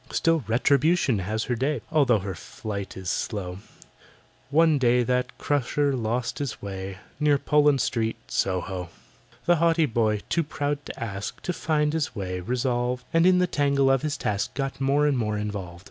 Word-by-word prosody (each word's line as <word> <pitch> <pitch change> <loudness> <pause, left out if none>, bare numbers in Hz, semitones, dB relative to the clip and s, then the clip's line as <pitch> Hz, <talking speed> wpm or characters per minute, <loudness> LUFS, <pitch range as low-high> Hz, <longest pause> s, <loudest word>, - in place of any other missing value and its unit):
Still, 165 -3 +2
Retribution 135 - +3
has 110 +4 -2
her 125 - -1
day, 135 +2 -1
Although 140 -7 +4
her 95 -1 -4
flight 100 +3 -6
is 95 -1 -7
slow: 95 -4 -3 0.9
One 155 0 +4
day 125 -1 +3
that 125 +1 -1
Crusher 145 0 0
lost 120 0 -2
his 140 -5 -3
way 95 -1 -6 0.2
Near 150 -1 +4
Poland 150 -1 +3
Street, 115 -1 0
Soho. 90 -1 -2 0.6
The 175 0 +4
haughty 165 0 +3
boy, 110 -5 +1
too 170 - +1
proud 145 -1 -3
to - - -8
ask, 100 -3 -5
To 180 - -1
find 150 -2 0
his 160 -5 -1
way 90 -3 -3
resolved, 125 +3 -1
And 165 +2 +5
in 185 -1 +5
the 180 - +4
tangle 140 -5 +2
of 135 -1 +2
his 155 -1 -2
task 100 -1 -2
Got 135 -1 -3
more 140 +2 +3
and 140 -4 +2
more 105 -2 -1
involved. 100 -4 -5
125 Hz, 170 wpm, -26 LUFS, 105-145 Hz, 0.9 s, And